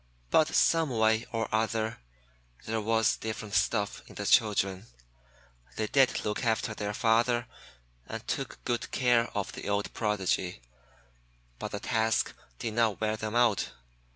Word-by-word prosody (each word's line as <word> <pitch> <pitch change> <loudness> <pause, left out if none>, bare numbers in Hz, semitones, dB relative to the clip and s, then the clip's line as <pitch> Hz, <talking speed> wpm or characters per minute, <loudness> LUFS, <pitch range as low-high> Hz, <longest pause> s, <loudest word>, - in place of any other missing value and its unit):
But 155 - +5
some 165 -2 +4
way 110 -1 +2
or 115 -1 -1
other, 110 0 0 0.7
there 110 0 -1
was 110 0 +2
different 110 -2 -5
stuff 105 -3 +1
in - - -14
the - - -4
children. 100 -2 +2 0.9
They - - -1
did 135 +4 +2
look 105 +3 -2
after 110 0 0
their 105 -1 -4
father, 120 0 +2 0.6
and - - -7
took - - -4
good 120 -1 -1
care 120 -2 +3
of 100 - -2
the - - -6
old 100 0 -1
Prodigy, 95 - -1 1.0
but - - -5
the 100 - -3
task 110 0 +1 0.2
did 110 - -4
not 110 -3 +2
wear 110 0 0
them 110 +1 -4
out. 120 -4 +2
110 Hz, 145 wpm, -29 LUFS, 105-115 Hz, 1.0 s, But